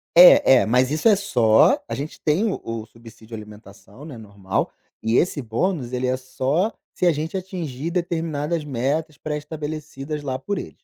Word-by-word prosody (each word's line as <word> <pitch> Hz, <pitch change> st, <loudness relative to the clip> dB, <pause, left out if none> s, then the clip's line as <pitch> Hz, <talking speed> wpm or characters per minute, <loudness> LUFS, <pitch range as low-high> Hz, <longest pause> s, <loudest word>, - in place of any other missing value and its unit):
É, 170 Hz, -6 st, +8 dB
é, -, -, 0 dB
mas 125 Hz, +3 st, +2 dB
isso 155 Hz, +7 st, +1 dB
é 205 Hz, -, +6 dB
só 120 Hz, -, +3 dB
a 115 Hz, -, -2 dB
gente 145 Hz, +4 st, -7 dB
tem 160 Hz, +9 st, +1 dB
o -, -, -5 dB
o 115 Hz, -1 st, -5 dB
subsídio 115 Hz, 0 st, -13 dB
alimentação, 105 Hz, +3 st, -13 dB
né, 150 Hz, -6 st, -9 dB
normal, 100 Hz, -3 st, -3 dB, 0.3 s
e 110 Hz, +2 st, 0 dB
esse 160 Hz, -4 st, +1 dB
bônus 125 Hz, -, -2 dB
ele 125 Hz, 0 st, -2 dB
é 125 Hz, 0 st, +1 dB
só 135 Hz, -, -1 dB, 0.2 s
se 180 Hz, -, +1 dB
a -, -, +6 dB
gente 155 Hz, +3 st, -4 dB
atingir 170 Hz, -6 st, -4 dB
determinadas 165 Hz, -3 st, -2 dB
metas 145 Hz, +3 st, -2 dB
pré-estabelecidas 150 Hz, -1 st, -5 dB
lá 130 Hz, -3 st, -3 dB
por 200 Hz, +8 st, -3 dB
eles. -, -, -9 dB
145 Hz, 170 wpm, -22 LUFS, 120-160 Hz, 0.3 s, É